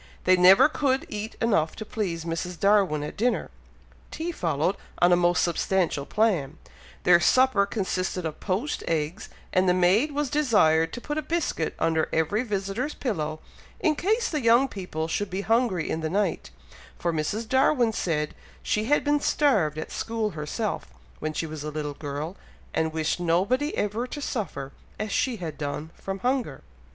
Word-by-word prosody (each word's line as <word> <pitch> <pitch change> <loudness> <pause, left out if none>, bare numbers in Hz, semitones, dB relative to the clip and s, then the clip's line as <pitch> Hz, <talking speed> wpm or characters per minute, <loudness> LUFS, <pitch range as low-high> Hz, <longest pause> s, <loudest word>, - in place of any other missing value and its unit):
They 185 - +5
never 185 +5 +7
could 270 -3 0
eat 215 +1 -5
enough 165 -9 +1
to 215 - -7
please 180 -8 -3
Mrs. 170 +1 -4
Darwin 195 -7 +3
at 150 - -6
dinner; 240 +4 0 0.6
tea 330 +2 -4
followed, 170 - 0 0.2
on 175 +1 +4
a - - +7
most 175 -1 +3
substantial 170 -4 0
plan; 170 -9 +1 0.5
their 175 -1 +6
supper 255 -1 +4
consisted 185 -3 -2
of 155 -1 -4
poached 210 +10 -2
eggs, 165 +6 -2 0.2
and 185 -1 +3
the 180 - +4
maid 190 +11 +3
was 290 -2 -2
desired 185 - +3
to 245 - -6
put 295 +3 -3
a - - -2
biscuit 305 - -2
under 160 -1 +1
every 160 +8 +1
visitor's 210 +4 -3
pillow, 155 - -3 0.4
in 315 - +2
case 440 +9 +1
the 305 -3 -2
young 235 +3 +5
people 180 -8 -4
should 205 +4 -2
be 190 +2 -3
hungry 225 -5 +1
in 160 - -2
the 160 - -2
night, 200 +4 -1 0.5
for 170 -1 -1
Mrs. 205 +9 -2
Darwin 260 -2 +3
said 150 -7 -1 0.3
she 215 +1 0
had 290 +5 +2
been 295 0 +2
starved 205 - +2
at 155 - -5
school 225 -2 -2
herself, 155 +8 -3 0.3
when 155 - -2
she 160 - -2
was 155 -2 -6
a 150 - -3
little 150 -1 -4
girl, 145 +4 -5 0.4
and 160 0 0
wished 160 +1 -1
nobody 195 - +1
ever 215 +4 -1
to 290 - -6
suffer, 185 - -4 0.3
as 215 0 -3
she 255 +2 +1
had 165 -7 -6
done, 150 +2 -4
from 195 0 -5
hunger. 245 - -1
190 Hz, 170 wpm, -26 LUFS, 160-235 Hz, 0.6 s, never